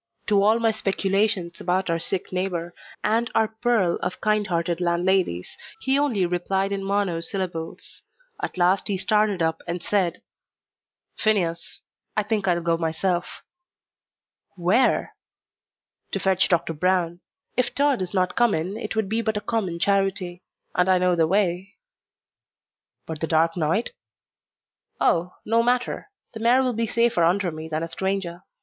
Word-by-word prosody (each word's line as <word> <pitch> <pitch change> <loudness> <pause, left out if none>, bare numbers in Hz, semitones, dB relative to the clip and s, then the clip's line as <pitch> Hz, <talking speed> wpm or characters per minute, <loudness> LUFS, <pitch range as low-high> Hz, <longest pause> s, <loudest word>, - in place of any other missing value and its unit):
To 205 -1 +4
all 215 +3 +4
my 230 -1 +2
speculations 195 -3 0
about 185 +2 0
our 165 -1 0
sick 185 +2 -2
neighbour, 180 -2 -2 0.3
and 230 +3 +1
our 220 -1 +3
pearl 225 -8 +2
of 180 - -4
kind 215 -1 +1
hearted 170 0 -1
landladies, 175 - +1 0.3
he 270 +1 +2
only 240 -11 +1
replied 190 +3 -1
in 195 -1 -2
monosyllables; 185 -3 -3 0.4
at 410 - -4
last 180 +2 +2
he 200 - 0
started 210 -2 +1
up 160 0 0
and 170 0 -3
said, 190 -5 0 1.0
"Phineas, 180 -6 0 0.4
I 215 - +3
think 210 -1 -1
I'll 175 -1 +1
go 165 0 +2
myself." 175 +2 -2 1.1
"Where?" 195 +8 +2 1.0
"To - - 0
fetch 190 -1 +2
Doctor 170 -2 +1
Brown. 175 +1 0 0.4
If 250 0 0
Tod 280 -4 +2
is 185 - -3
not 185 -1 +1
come 240 -3 +3
in 180 +6 -3
it 220 -1 -5
would 220 -2 0
be 220 +3 0
but 220 -2 -1
a - - +1
common 205 -6 -2
charity. 190 -1 0 0.3
And 180 +1 +2
I 185 - +5
know 180 0 +2
the 165 -2 +3
way." 190 0 0 1.3
"But 160 -2 -6
the 160 - 0
dark 165 +1 +2
night?" 170 +7 0 1.1
"Oh, 175 +1 +1
no 230 +2 +3
matter; 250 - 0 0.2
the 220 - -7
mare 240 +4 +4
will 250 -1 0
be 230 0 -1
safer 230 -6 +2
under 180 +2 +2
me 155 +1 -7
than 155 +1 -2
a - - -2
stranger. 190 -1 -3
190 Hz, 155 wpm, -24 LUFS, 170-215 Hz, 1.3 s, I